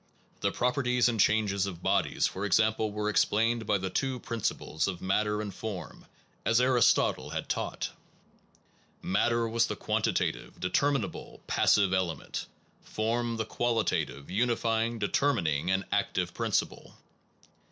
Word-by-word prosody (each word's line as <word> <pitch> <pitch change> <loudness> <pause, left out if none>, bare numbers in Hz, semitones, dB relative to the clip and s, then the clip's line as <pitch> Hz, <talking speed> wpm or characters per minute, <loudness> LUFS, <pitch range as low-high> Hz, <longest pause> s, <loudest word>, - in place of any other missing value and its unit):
The - - 0
properties 125 -1 +1
and 115 -2 -1
changes 100 -2 +2
of 90 -4 -7
bodies, - - +1
for 95 - -3
example, 110 +1 +2
were 105 0 -2
ex 105 - +4
plained 115 +1 0
by 105 - +3
the 95 0 -4
two 135 -2 -1
principles 110 -9 -2
of 90 -3 -3
matter 105 +2 0
and 100 -2 -6
form, 105 -2 -7 0.4
as 115 +2 +3
Aristotle 125 -2 +3
had - - -4
taught. - - -3 1.1
Matter 115 +4 +1
was 115 +1 +2
the - - -3
quantitative, - - -1
determinable, 135 +4 -1
passive 100 -2 +3
element; 90 -5 -2 0.3
form, 115 +1 -2
the 110 - -1
qualitative, 115 -12 -1
unifying, 115 +1 +1
determining, 95 - +1
and 95 0 +1
active - - 0
principle. - - -2
110 Hz, 130 wpm, -29 LUFS, 100-120 Hz, 1.1 s, ex